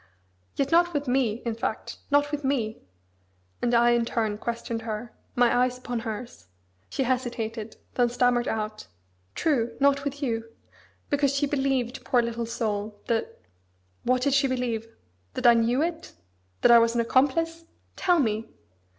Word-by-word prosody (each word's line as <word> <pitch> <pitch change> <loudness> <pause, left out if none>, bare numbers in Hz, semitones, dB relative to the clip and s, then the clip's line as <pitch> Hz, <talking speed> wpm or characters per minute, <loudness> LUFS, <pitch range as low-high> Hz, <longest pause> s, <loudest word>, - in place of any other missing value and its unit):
"Yet 275 0 0
not 345 +1 +4
with 290 -1 -1
me, 245 -3 +1
in 230 - 0
fact, 225 - -4
not 290 0 +3
with 295 -1 -3
me!" 245 -6 -1 0.8
And 240 - +1
I, 240 +1 +5
in 240 0 +3
turn, 220 -3 -1
questioned 235 -1 -3
her; 225 +1 -5 0.2
my 245 -1 +4
eyes 250 0 +2
upon 245 -1 -4
hers. 225 - -7 0.4
She 270 - -1
hesitated: 235 -3 -2 0.2
then 245 -1 +2
stammered 245 0 +2
out, 215 - -3 0.5
"True! 240 -7 0
not 280 0 +3
with 285 +1 -4
you! 230 -3 -2 0.6
because 280 -1 +2
she 280 - +2
believed, 270 -3 -1
poor 245 -2 +2
little 235 0 -3
soul! 210 -3 -3
that..." 230 -2 -2 0.6
"What 255 0 +1
did 280 - +2
she 275 0 +4
believe? 245 -3 -2 0.5
That - - -3
I 240 - +9
knew 235 +5 +2
it? 335 -1 -4 0.5
That - - +6
I 235 - +9
was 230 0 +2
an 235 - +3
accomplice? 330 +7 +1 0.3
Tell 355 -2 +3
me!" 225 -6 0
245 Hz, 160 wpm, -26 LUFS, 230-275 Hz, 0.8 s, I